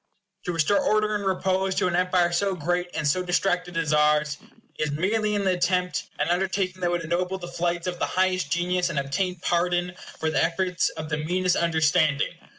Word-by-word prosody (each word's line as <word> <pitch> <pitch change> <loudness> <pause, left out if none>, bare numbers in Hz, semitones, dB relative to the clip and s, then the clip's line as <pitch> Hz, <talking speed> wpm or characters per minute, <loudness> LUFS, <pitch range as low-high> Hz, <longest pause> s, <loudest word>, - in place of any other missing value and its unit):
To 180 - -1
restore 165 +4 +2
order 215 0 +1
and 205 -1 -2
repose 190 0 0
to - - +1
an 175 - 0
empire 180 -1 +2
so 190 +2 0
great 175 +2 -1
and 150 - -1
so 185 +6 +2
distracted 180 -1 0
as 160 -2 0
ours, 150 0 +2 0.4
is, 155 - 0
merely 210 +7 0
in 205 - 0
the 190 - +2
attempt, 180 -2 0
an - - 0
undertaking 185 +1 -1
that 175 - +1
would 175 -1 -1
ennoble 180 +3 -1
the 175 -2 -8
flights 175 0 -2
of 180 -1 -3
the - - 0
highest 185 -4 +1
genius, 180 +1 +1
and 160 - -4
obtain 180 +7 -1
pardon 175 +1 0 0.3
for 160 0 0
the - - +2
efforts 180 +2 0
of 155 -1 -7
the 150 - -1
meanest 180 +4 0
understanding. 155 -2 +2
180 Hz, 195 wpm, -25 LUFS, 165-185 Hz, 0.4 s, restore